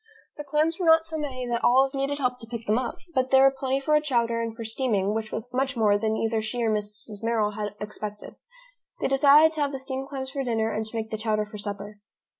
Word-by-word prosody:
The 295 - -5
clams 305 +4 0
were 355 - 0
not 325 0 +6
so 320 0 -4
many 255 -4 -4
that 235 -1 -2
Olive 265 +2 +4
needed 275 +1 -1
help 250 -3 -1
to 225 - -7
pick 230 -1 -6
them 215 +2 +2
up, 255 - -4 0.2
but 260 -1 +1
there 265 0 +6
were 270 - +7
plenty 270 0 -1
for 300 +3 0
a 300 - +4
chowder 235 -5 0
and 230 -1 -4
for 230 - -6
steaming, 220 -4 0
which 220 0 -3
was 220 - -4
much 265 0 0
more 210 -2 +4
than 220 +1 0
either 225 0 0
she 235 +2 -2
or 225 - +2
Mrs. 210 0 -4
Merrill 225 -2 +1
had 210 -1 -5
expected. 210 0 -7 0.6
They - - 0
decided 290 +4 +6
to 310 - -2
have 285 -1 +1
the 270 - -4
steamed 265 0 -5
clams 265 -2 -5
for 275 -1 -2
dinner 225 -3 0
and 215 +1 -2
to 220 - -7
make 220 0 -4
the 220 - -3
chowder 215 -1 0
for 210 0 -10
supper. 205 0 -6
235 Hz, 250 wpm, -26 LUFS, 215-270 Hz, 0.6 s, were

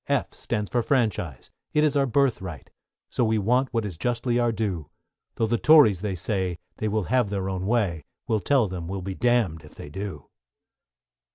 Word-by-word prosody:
=F= - - 0
stands 105 -1 -3
for 120 - +2
Franchise, 110 - -1 0.2
it 150 - +4
is 150 -2 +2
our 140 -1 +3
birthright, 110 - -1 0.4
So - - +1
we 110 -1 +2
want 125 +6 +2
what 115 -2 -1
is 90 -6 -6
justly 120 +1 0
our 120 -1 +2
due; 100 -9 -3 0.5
Tho' 115 - +1
the 115 +1 0
Tories 140 - +6
they 100 -3 -2
say, 95 -1 -2 0.2
they 110 - -2
will 105 0 0
have 125 0 +1
their 100 -2 -2
own 95 0 -3
way, 100 -10 0 0.2
We'll 110 - +1
tell 125 +3 +2
them, 90 -3 -5
we'll 95 0 -4
be 95 +1 -4
damn'd 110 -8 +1
if 75 - -15
they - - -9
do. 100 +4 -6
105 Hz, 190 wpm, -25 LUFS, 95-120 Hz, 0.5 s, Tories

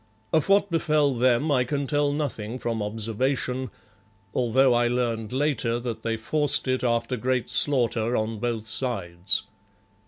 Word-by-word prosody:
Of 160 0 +2
what 200 -1 +3
befell 155 -4 +2
them 125 +4 +2
I 130 -3 +3
can 140 +3 -2
tell 145 +1 +1
nothing 125 -6 -3
from 115 -2 -3
observation, 125 +5 -2 0.6
although 125 +2 +3
I 120 0 +2
learned 120 -3 -1
later 130 -4 0
that 120 -2 -5
they 115 -1 -2
forced 145 +6 +1
it 130 0 0
after 120 +1 0
great 125 +1 -1
slaughter 125 -3 +2
on 110 0 -2
both 115 -1 -3
sides. 100 -6 0
125 Hz, 145 wpm, -25 LUFS, 115-140 Hz, 0.6 s, what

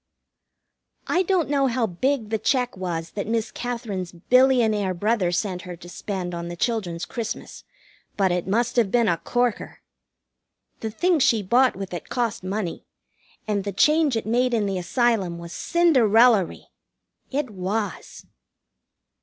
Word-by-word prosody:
I 360 - +2
don't 370 -3 +1
know 275 -1 +2
how 240 -1 +1
big 225 +4 -1
the 220 - 0
check 250 0 0
was 170 -3 -4
that 200 - -4
Miss 225 0 -1
Katherine's 225 -7 -4
billionaire 220 -1 +3
brother 205 -1 +1
sent 180 +1 -2
her 180 0 -8
to 170 +1 -13
spend 180 0 -5
on 170 0 -4
the 175 - -6
children's 180 -5 -2
Christmas, 225 -2 -6 0.5
but 195 -3 +2
it 180 0 -1
must 235 +5 0
have 225 -5 +3
been 235 +1 +2
a 170 - +2
corker. 245 -2 -2 1.0
The 220 - -3
things 335 +8 +1
she 225 -4 +3
bought 250 +6 +3
with 195 -1 -6
it 175 - -6
cost 235 -4 -2
money, 190 -1 -3 0.6
and 205 -2 0
the 200 - -3
change 300 - +3
it 225 - -3
made 245 +2 +1
in 215 -2 +1
the 195 -2 -1
Asylum 195 -2 0
was 170 0 -9
Cinderellary. 240 - +3 0.6
It 270 -3 -2
was. 205 +3 -4
220 Hz, 150 wpm, -24 LUFS, 185-245 Hz, 1.0 s, billionaire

